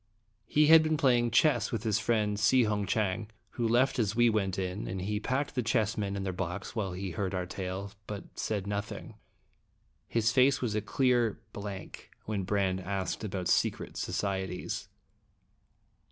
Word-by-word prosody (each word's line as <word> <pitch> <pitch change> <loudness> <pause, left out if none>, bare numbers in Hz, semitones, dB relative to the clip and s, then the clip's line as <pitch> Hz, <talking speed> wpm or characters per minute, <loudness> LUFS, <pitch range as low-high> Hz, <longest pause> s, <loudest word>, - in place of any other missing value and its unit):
He 150 +5 +4
had 160 +1 +9
been 155 0 +1
playing 120 -4 +3
chess 120 -1 +3
with 115 -3 -2
his 110 -2 +1
friend 105 -3 +1
Si 125 +5 +5
Hung 105 -2 0
Chang, 105 0 0 0.2
who 120 -2 -1
left 125 +3 +3
as 105 -2 +1
we 120 0 +5
went 100 -4 0
in, 95 +1 -3
and 95 +1 -4
he 105 +2 -1
packed 130 +7 -1
the 130 - 0
chessmen 105 -3 0
in 100 - -3
their 95 -1 -2
box 90 +4 -4
while 100 -5 -2
he 95 +1 -4
heard 95 +2 -2
our 90 -1 -1
tale, 95 +2 -5 0.2
but 105 -1 -5
said 105 -3 -2
nothing. 100 0 -4 0.9
His 115 -1 +1
face 130 +2 +4
was 120 -4 -1
a 105 - 0
clear 120 0 +1
blank 100 -2 -7 0.2
when 100 -3 -2
Brande 95 -1 +1
asked 95 +1 -3
about 95 -4 -3
secret - - +1
societies. 95 -2 -3
105 Hz, 170 wpm, -30 LUFS, 95-115 Hz, 0.9 s, had